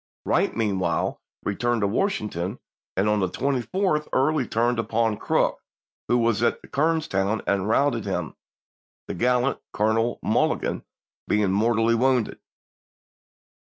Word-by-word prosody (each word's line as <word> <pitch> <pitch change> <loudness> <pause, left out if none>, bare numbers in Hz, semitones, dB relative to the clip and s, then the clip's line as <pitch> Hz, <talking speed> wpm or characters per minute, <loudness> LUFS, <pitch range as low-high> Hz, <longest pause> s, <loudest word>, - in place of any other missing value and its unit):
Wright - - +1
meanwhile 95 -6 0 0.2
returned 120 +3 0
to 100 - +2
Washington; 105 - -1 0.4
and 95 +2 +2
on 105 0 +2
the 95 -2 0
24th 150 - 0
Early 135 -1 +2
turned 120 +1 +1
upon 115 -1 0
Crook, - - +1 0.5
who 120 - +3
was 115 -2 +1
at 120 - +2
Kernstown, 140 -10 0
and 100 0 0
routed 140 +5 +2
him, - - -3 0.7
the - - -3
gallant 125 +2 +1
Colonel 110 +3 +1
Mulligan - - 0 0.4
being 105 -2 +2
mortally 115 +3 +2
wounded. 125 0 +1
115 Hz, 120 wpm, -24 LUFS, 105-130 Hz, 0.7 s, who